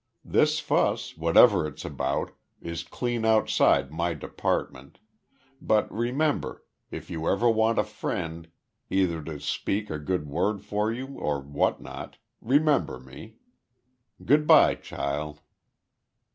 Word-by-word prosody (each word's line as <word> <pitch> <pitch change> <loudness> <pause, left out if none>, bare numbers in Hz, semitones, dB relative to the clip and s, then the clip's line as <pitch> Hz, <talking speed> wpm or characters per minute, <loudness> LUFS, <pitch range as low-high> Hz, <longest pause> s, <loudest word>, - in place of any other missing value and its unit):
This - - +2
fuss, - - 0
whatever 85 +3 +5
it's 75 - -9
about, - - -2 0.3
is 85 -1 -5
clean 120 -2 -3
outside 110 -10 +3
my 85 +1 -1
department, 70 -1 -3 0.6
but 110 -1 +1
remember, 130 +7 -1 0.2
if - - -8
ever 85 +7 0
you - - +6
want 110 +1 +2
a - - +4
friend 85 -5 -5 0.4
either 90 -4 +1
to 75 -1 -7
speak 105 +7 -2
a 75 - -3
good 75 +1 -2
word 95 +7 -1
for 105 +2 0
you 125 +3 -4
or 75 -1 -1
what 70 +1 -1
not - - -9 0.2
remember 145 +4 +2
me. 65 - -13 0.9
Good 150 +3 +3
bye, - - +7
child." 75 +2 -5
95 Hz, 125 wpm, -26 LUFS, 75-110 Hz, 0.9 s, bye